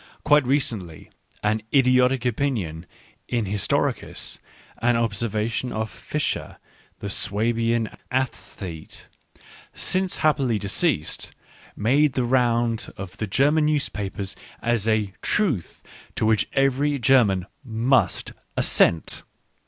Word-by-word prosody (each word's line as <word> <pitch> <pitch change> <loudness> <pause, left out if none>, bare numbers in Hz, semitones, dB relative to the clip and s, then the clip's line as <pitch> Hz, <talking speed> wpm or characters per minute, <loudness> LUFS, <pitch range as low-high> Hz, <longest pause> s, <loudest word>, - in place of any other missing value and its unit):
Quite 150 -3 +4
recently 110 - -1 0.3
an 105 +1 +1
idiotic 125 -1 +4
opinion 105 - -1 0.4
in 120 -3 0
historicis, 100 0 -1 0.4
an 120 0 +3
observation 115 +1 -1
of 110 0 -3
Vischer - - -3 0.4
the 100 - -4
Swabian 115 +3 0 0.2
aesthete, 95 -9 -4 0.7
since 185 0 0
happily 135 -7 +2
deceased, 100 -2 0 0.4
made 135 +6 +3
the 130 - 0
round 120 -2 +1
of 95 -2 -8
the 110 - -3
German 145 +8 +3
newspapers 100 -10 -2 0.2
as 115 -3 0
a 110 -3 +1
" - - -44 0.2
truth 160 - -1 0.2
" - - -24
to - - 0
wliich 110 -1 +3
every 135 +2 +2
German 115 -8 +4 0.2
must 115 -4 +1 0.2
assent. 85 -2 +3
115 Hz, 105 wpm, -24 LUFS, 105-130 Hz, 0.7 s, Quite